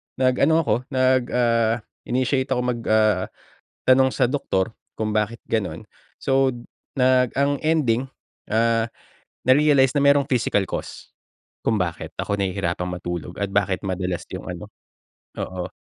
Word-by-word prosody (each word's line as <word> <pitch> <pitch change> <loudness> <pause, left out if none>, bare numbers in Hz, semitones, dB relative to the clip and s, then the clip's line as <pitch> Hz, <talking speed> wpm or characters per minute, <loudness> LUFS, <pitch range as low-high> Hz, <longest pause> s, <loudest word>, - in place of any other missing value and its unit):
nag-ano 140 +5 +3
ako 105 - +2
nag 130 -1 +2
ah, 115 -2 +2 0.2
initiate 130 +1 0
ako 130 -2 0
mag 125 -1 -1
ah, 110 -4 +3 0.6
tanong 130 0 +5
sa 130 - +1
doktor 115 -6 -1 0.2
kung 110 -1 -1
bakit 110 +2 0
ganun. 90 -7 -2 0.3
So, 135 0 +2 0.5
nag 125 -1 +4
ang 140 0 +1
ending, 135 -6 +1 0.4
ah, 115 +1 +2 0.6
na-realize 135 0 +5
na 140 - +3
may 140 0 +6
physical 105 - +1
cost - - -7 0.5
kung 110 -3 +1
bakit 85 -3 -3
ako 100 - -1
nahihirapan 90 -2 -2
matulog 90 -1 -5
at 100 - 0
bakit 100 -2 +1
madalas 90 -1 -3
yung - - -7
ano. - - -8 0.7
Oo. 90 -1 -4
115 Hz, 135 wpm, -23 LUFS, 100-130 Hz, 0.7 s, may